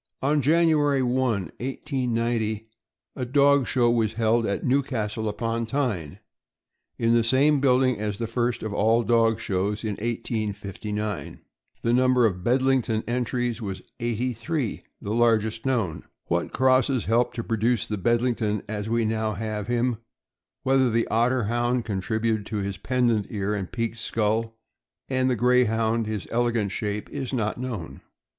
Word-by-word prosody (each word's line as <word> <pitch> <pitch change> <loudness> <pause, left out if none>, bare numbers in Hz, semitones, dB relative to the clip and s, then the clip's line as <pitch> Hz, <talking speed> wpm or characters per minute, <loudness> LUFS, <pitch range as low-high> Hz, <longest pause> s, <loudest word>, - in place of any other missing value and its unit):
On 145 +2 +2
January 150 -2 +3
1, 125 -1 0
1890, 115 - -1 0.5
a 130 - -3
dog 140 +1 +4
show 120 -2 +3
was 110 -2 +1
held 115 0 +2
at 100 - -2
Newcastle 115 -5 0
upon 115 +1 -2
Tyne, 110 - -2 0.8
in 115 0 +2
the 120 -1 +4
same 135 +5 +4
building 130 -3 +3
as 105 -1 -2
the 115 - -2
first 120 +1 -1
of 110 -2 -3
all 110 +3 +3
dog 115 0 +3
shows, 100 +3 -1
in 110 - -1
1859. 105 -2 -4 0.4
The 115 - +2
number 125 -1 +4
of 90 -4 -1
Bedlington 125 -2 +2
entries 120 0 -1
was 100 -3 -5 0.2
eighty 120 +1 -1
three 125 +1 -3
— - - -49
the 105 - -2
largest 110 0 +2
known. 110 -12 -1 0.2
What - - -1
crosses 130 -1 +2
helped 120 +3 +1
to 115 - -3
produce 115 0 +1
the 105 -2 -4
Bedlington 115 -1 +1
as 105 0 -4
we 115 0 +1
now 110 0 0
have 105 0 -4
him, 120 0 0 0.7
whether 130 -1 +3
the 115 0 +1
Otter 120 +2 +2
Hound 120 +2 0
contributed 110 +1 -1 0.2
his 100 0 -4
pendent 120 -5 +1
ears 105 0 -2
and 95 -3 -4
peaked 115 -1 -3
skull, 115 +1 -1 0.5
and 130 -1 +1
the 125 - +2
Greyhound 115 -2 +2
his 105 -6 -3
ele 120 +1 +2
gant 110 -4 -1
shape, 105 +1 -3
is 135 -3 -4
not 115 -3 -1
known. 105 - -5
115 Hz, 150 wpm, -25 LUFS, 110-125 Hz, 0.8 s, dog